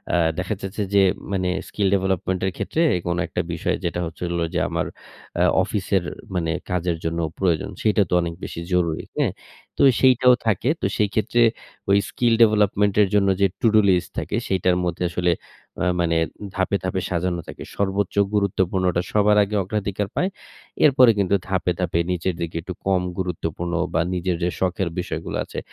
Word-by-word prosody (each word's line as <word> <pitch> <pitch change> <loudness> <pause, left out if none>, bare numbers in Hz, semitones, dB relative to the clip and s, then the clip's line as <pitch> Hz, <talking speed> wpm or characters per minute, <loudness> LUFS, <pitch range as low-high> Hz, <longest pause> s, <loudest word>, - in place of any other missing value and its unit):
আ - - +4 0.2
দেখা 95 +3 -2
যাচ্ছে 95 +2 -3
যে, 100 - +6 0.3
মানে, 90 -2 0 0.2
স্কিল 100 -2 -1
ডেভেলপমেন্টের 95 0 -1
ক্ষেত্রে 165 - -1 0.3
কোন 85 0 0
একটা - - -2
বিষয়, - - -1
যেটা 85 +1 -1
হচ্ছে 85 +2 -7
হলো 85 -1 0
যে, - - +1
আমার - - -1 0.6
আ - - +5 0.2
অফিসের 95 -2 0 0.3
মানে 80 -2 0 0.2
কাজের 90 -2 0
জন্য 85 +1 -1 0.2
প্রয়োজন, 85 -5 +1
সেটা 105 -1 +3
তো - - -2
অনেক 85 -1 -3
বেশি - - -5
জরুরি, 85 -3 +1
হ্যাঁ? - - +1 0.5
তো - - +5 0.2
সেইটাও 125 -1 +6
থাকে। 110 +5 +1
তো - - -1
সেই 105 -2 +2
ক্ষেত্রে, 115 +2 +1 0.5
ওই 100 - +6
স্কিল 120 -2 +1
ডেভেলপমেন্টের 105 -2 +4
জন্য 100 -1 +3
যে 100 - +6
টু-ডু 110 -2 +4
লিস্ট 90 -1 +2
থাকে, - - -3
সেটার 90 -1 +2
মধ্যে 90 +1 -2
আসলে, 90 0 +1 0.5
আ - - +2 0.2
মানে 85 -1 +1 0.4
ধাপে, 95 +1 0
ধাপে 95 0 -1
সাজানো 85 -1 -1
থাকে। - - -8
সর্বোচ্চ 100 0 -1 0.2
গুরুত্বপূর্ণটা 95 -3 +1
সবার 105 0 +4
আগে 105 +1 -3
অগ্রাধিকার 100 0 -2
পায়। 185 - +1 0.6
এরপরে 130 -4 +6
কিন্তু 100 0 +2
ধাপে, 90 -2 0
ধাপে 85 -2 0
নিচের 90 0 -1
দিকে, 85 0 -4
একটু 90 +1 -6
কম 95 -2 +2 0.2
গুরুত্বপূর্ণ 85 -1 -3 0.2
বা 80 - +2
নিজের 90 0 -1
যে 90 - +2
শখের 95 -1 0
বিষয়গুলো - - -4
আছে, - - -6
95 Hz, 170 wpm, -22 LUFS, 90-100 Hz, 0.6 s, যে